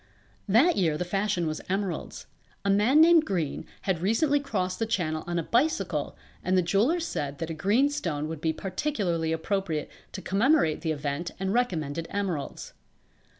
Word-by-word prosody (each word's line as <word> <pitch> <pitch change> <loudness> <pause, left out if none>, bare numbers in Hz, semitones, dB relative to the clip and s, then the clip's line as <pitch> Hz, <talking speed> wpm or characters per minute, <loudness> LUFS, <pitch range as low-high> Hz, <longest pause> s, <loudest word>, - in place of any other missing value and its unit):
That 280 - +5
year 160 -5 +2
the 180 - -2
fashion 195 -1 0
was 155 -1 -3
emeralds. 195 -1 -3 0.4
A 200 - +3
man 225 +10 +5
named 330 -1 +7
Green 175 - -2 0.2
had 185 -4 0
recently 275 - +2
crossed 195 -10 -2
the 225 - 0
Channel 160 -7 -1
on 175 0 -1
a 170 - 0
bicycle 265 - 0 0.3
and 185 +1 +2
the 180 - +3
jewellers 255 - +2
said 140 - -3
that 165 0 -4
a - - -2
green 205 - +3
stone 170 - -2
would 160 -1 -6
be 160 - +1
particularly 185 - -2
appropriate 165 -2 -2 0.2
to - - -6
commemorate 205 - +2
the 160 - -1
event 150 +3 -3
and 190 +1 -1
recommended 165 -10 -1
emeralds. 185 -8 -4
185 Hz, 165 wpm, -27 LUFS, 160-230 Hz, 0.4 s, named